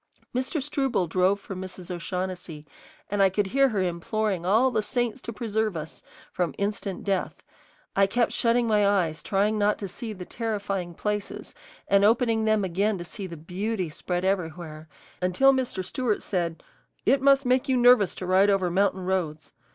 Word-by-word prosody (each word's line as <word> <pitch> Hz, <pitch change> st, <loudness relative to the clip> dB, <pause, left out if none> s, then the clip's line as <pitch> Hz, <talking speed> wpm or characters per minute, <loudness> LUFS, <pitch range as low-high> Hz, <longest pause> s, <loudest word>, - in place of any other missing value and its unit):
Mr. 260 Hz, +5 st, -1 dB
Struble 270 Hz, -7 st, 0 dB
drove 185 Hz, +4 st, +2 dB
for 195 Hz, -, -8 dB
Mrs. 185 Hz, -1 st, -8 dB
O'Shaughnessy, 180 Hz, -3 st, -5 dB, 0.5 s
and 205 Hz, -1 st, +1 dB
I 195 Hz, -, +6 dB
could 200 Hz, +2 st, 0 dB
hear 270 Hz, +7 st, +3 dB
her 205 Hz, -5 st, 0 dB
imploring 180 Hz, +1 st, -2 dB
all 230 Hz, +7 st, +4 dB
the 220 Hz, -, +1 dB
saints 240 Hz, +2 st, -2 dB
to -, -, -6 dB
preserve 220 Hz, -3 st, -1 dB
us 155 Hz, 0 st, -8 dB, 0.3 s
from 175 Hz, -5 st, -2 dB
instant 200 Hz, -1 st, -3 dB
death. 195 Hz, -2 st, -2 dB, 0.5 s
I 195 Hz, 0 st, +4 dB
kept 235 Hz, +4 st, +1 dB
shutting 235 Hz, +1 st, +2 dB
my 210 Hz, -3 st, +3 dB
eyes, 175 Hz, -6 st, +1 dB
trying 210 Hz, +2 st, +1 dB
not 205 Hz, 0 st, +2 dB
to 200 Hz, -, -5 dB
see 225 Hz, +4 st, -7 dB
the 185 Hz, -3 st, -8 dB
terrifying 200 Hz, -6 st, -3 dB
places, 210 Hz, +1 st, -4 dB, 0.3 s
and 200 Hz, 0 st, +4 dB
opening 225 Hz, 0 st, +3 dB
them 215 Hz, -1 st, +2 dB
again 195 Hz, +3 st, 0 dB
to 175 Hz, -, -7 dB
see 195 Hz, +2 st, -6 dB
the 170 Hz, -2 st, -8 dB
beauty 185 Hz, +2 st, -3 dB
spread 175 Hz, +3 st, -3 dB
everywhere, 165 Hz, -4 st, -3 dB, 0.3 s
until 185 Hz, +10 st, +4 dB
Mr. 250 Hz, -8 st, -2 dB
Stewart 225 Hz, +2 st, -1 dB
said, 170 Hz, -4 st, -2 dB, 0.4 s
"It 265 Hz, +3 st, +3 dB
must 275 Hz, 0 st, +4 dB
make 255 Hz, +1 st, +2 dB
you 260 Hz, -, +3 dB
nervous 245 Hz, -5 st, +5 dB
to 185 Hz, -, -5 dB
ride 190 Hz, +2 st, +4 dB
over 190 Hz, -3 st, +2 dB
mountain 190 Hz, 0 st, +1 dB
roads. 165 Hz, -5 st, -2 dB
200 Hz, 175 wpm, -26 LUFS, 180-225 Hz, 0.5 s, I